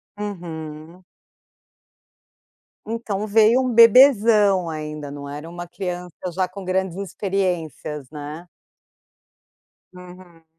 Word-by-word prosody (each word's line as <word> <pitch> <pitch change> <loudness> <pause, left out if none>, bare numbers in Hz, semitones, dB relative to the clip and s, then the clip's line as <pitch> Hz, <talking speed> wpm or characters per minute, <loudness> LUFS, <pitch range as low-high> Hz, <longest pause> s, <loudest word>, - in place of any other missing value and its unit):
Uhum. 170 -4 -7 1.8
Então 215 -2 -3
veio 220 +4 +4
um 255 -2 -1
bebezão 220 -6 +6
ainda 150 -2 -6
não 140 0 -8
era 145 +3 -7
uma 175 0 -8
criança 180 -1 -6 0.2
já 185 +1 0
com 190 +2 -10
grandes 185 -1 -1
experiências, 180 -8 -3
né. 150 +3 -8 1.5
Uhum. 180 -2 -14
180 Hz, 90 wpm, -22 LUFS, 160-205 Hz, 1.8 s, bebezão